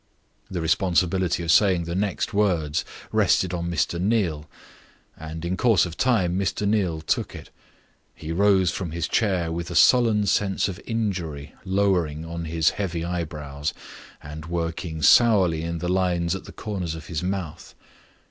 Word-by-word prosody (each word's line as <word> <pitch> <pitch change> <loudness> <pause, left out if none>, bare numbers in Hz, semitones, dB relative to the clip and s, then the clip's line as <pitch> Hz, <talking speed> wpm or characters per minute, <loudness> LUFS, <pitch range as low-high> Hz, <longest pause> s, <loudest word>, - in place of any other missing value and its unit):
The 90 -3 -3
responsibility 90 +1 +1
of 80 - +1
saying 95 -3 +4
the 85 +1 -5
next 100 +2 -1
words 85 -7 +1 0.3
rested 95 -1 +2
on 85 0 -2
Mr. 85 0 -1
Neal, 90 -8 0 0.7
and 80 +1 -7
in 90 +2 -1
course 110 -5 +3
of 85 -2 -7
time 95 -8 +1
Mr. 100 +1 -1
Neal 95 -7 0
took 80 - -2
it. - - -11 0.6
He 80 - -7
rose 95 0 +3
from 90 -3 -5
his 85 +1 -2
chair 95 -7 0
with 85 +1 -4
a 85 - -5
sullen 110 +2 +5
sense 100 0 +1
of 95 -2 -6
injury 90 -11 -3
lowering 95 -5 0
on 85 0 -5
his 80 0 +2
heavy 85 -4 -3
eyebrows, 75 -4 -4 0.5
and 75 +2 -8
working 85 -1 -3
sourly 95 - +5
in 85 +1 -3
the 90 +2 -4
lines 90 -2 +1
at 95 - -6
the - - -10
corners 95 -7 -4
of 80 - -9
his 80 -3 -4
mouth. 90 -4 -5
85 Hz, 155 wpm, -24 LUFS, 80-95 Hz, 0.7 s, sullen